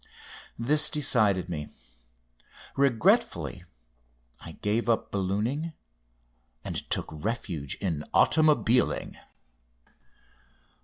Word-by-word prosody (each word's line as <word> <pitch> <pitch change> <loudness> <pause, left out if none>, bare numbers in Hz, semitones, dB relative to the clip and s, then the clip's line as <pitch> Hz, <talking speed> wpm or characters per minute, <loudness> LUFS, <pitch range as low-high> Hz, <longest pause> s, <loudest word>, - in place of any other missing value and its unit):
This 150 +6 +3
decided 110 - +2
me. 75 -4 -5 1.1
Regretfully 135 -5 +1 0.8
I - - -9
gave 110 +3 -1
up 115 - 0
ballooning 110 - -2 0.9
and - - -5
took - - -2
refuge 80 - -4
in 80 -7 -3
automobiling. 145 -6 +3
110 Hz, 70 wpm, -27 LUFS, 95-140 Hz, 1.1 s, This